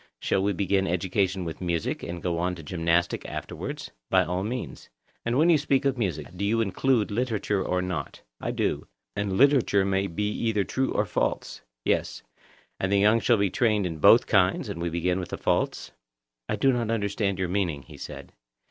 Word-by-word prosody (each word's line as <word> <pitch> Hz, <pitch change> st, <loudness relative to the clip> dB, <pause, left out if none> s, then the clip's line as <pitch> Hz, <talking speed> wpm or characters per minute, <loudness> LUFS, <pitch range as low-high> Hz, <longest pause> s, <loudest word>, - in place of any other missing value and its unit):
Shall 95 Hz, -, +1 dB
we 100 Hz, +1 st, +1 dB
begin 95 Hz, 0 st, +1 dB
education 95 Hz, +1 st, 0 dB
with 80 Hz, +1 st, -6 dB
music, 85 Hz, -3 st, -1 dB
and 85 Hz, 0 st, -6 dB
go 85 Hz, -2 st, -1 dB
on 90 Hz, +1 st, 0 dB
to 80 Hz, -, -10 dB
gymnastic 85 Hz, +2 st, 0 dB
afterwards? -, -, -6 dB, 0.2 s
By 95 Hz, -1 st, +4 dB
all 90 Hz, +3 st, -2 dB
means. 120 Hz, +4 st, -5 dB, 0.3 s
And 120 Hz, +2 st, 0 dB
when 165 Hz, +4 st, +5 dB
you 155 Hz, -, +5 dB
speak 140 Hz, -2 st, +1 dB
of 135 Hz, -1 st, +2 dB
music, 90 Hz, -, -3 dB
do 95 Hz, -, -4 dB
you 110 Hz, +3 st, +2 dB
include 115 Hz, +2 st, +1 dB
literature 105 Hz, -3 st, 0 dB
or 90 Hz, 0 st, 0 dB
not? 90 Hz, -7 st, -5 dB, 0.2 s
I -, -, -3 dB
do. -, -, -1 dB, 0.3 s
And 100 Hz, -2 st, -1 dB
literature 130 Hz, -8 st, +4 dB
may 95 Hz, 0 st, +1 dB
be 105 Hz, +5 st, -2 dB
either 110 Hz, -2 st, 0 dB
true 130 Hz, +6 st, -1 dB
or -, -, +1 dB
false? -, -, -2 dB, 0.2 s
Yes. -, -, 0 dB, 0.6 s
And 95 Hz, -, -1 dB
the 100 Hz, -, +4 dB
young 105 Hz, +3 st, +5 dB
should 115 Hz, -1 st, +3 dB
be 100 Hz, -2 st, +1 dB
trained 110 Hz, -5 st, +2 dB
in 80 Hz, -3 st, -4 dB
both -, -, +7 dB
kinds, -, -, +2 dB
and 85 Hz, -, -5 dB
we 85 Hz, -, -1 dB
begin 90 Hz, +2 st, 0 dB
with 90 Hz, -, -5 dB
the -, -, -4 dB
false? -, -, -1 dB, 0.6 s
I -, -, +1 dB
do 135 Hz, -1 st, +3 dB
not 120 Hz, -2 st, -1 dB
understand 100 Hz, -3 st, 0 dB
your 95 Hz, -2 st, -1 dB
meaning, 90 Hz, -7 st, -1 dB
he -, -, -13 dB
said. -, -, -9 dB
100 Hz, 195 wpm, -26 LUFS, 90-110 Hz, 0.6 s, both